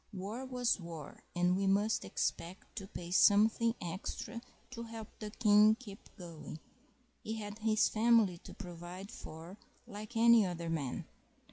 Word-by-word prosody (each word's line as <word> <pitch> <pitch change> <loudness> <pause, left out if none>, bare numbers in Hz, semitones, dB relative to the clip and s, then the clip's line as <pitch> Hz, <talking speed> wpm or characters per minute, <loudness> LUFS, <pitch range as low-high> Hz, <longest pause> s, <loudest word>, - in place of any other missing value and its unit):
War 205 +7 -5
was 250 -3 +1
war, 165 -4 -9
and 180 +1 +3
we 195 +1 0
must 205 +3 +2
expect 180 +3 -3
to 195 -3 -5
pay 175 -3 -8
something 220 +4 +5
extra 190 +6 -5 0.3
to 235 -2 -6
help 225 -2 -7
the 215 - -5
King 210 -1 +5
keep 215 -5 -12
going; 165 -4 -8 0.7
he 220 - -3
had 210 -1 -6
his 215 0 +3
family 220 -5 +3
to - - -12
provide 180 +2 -8
for 170 +1 -10 0.3
like 215 +3 -8
any 235 -1 +7
other 170 -3 -3
man. 145 -6 -3
205 Hz, 145 wpm, -34 LUFS, 175-225 Hz, 0.7 s, any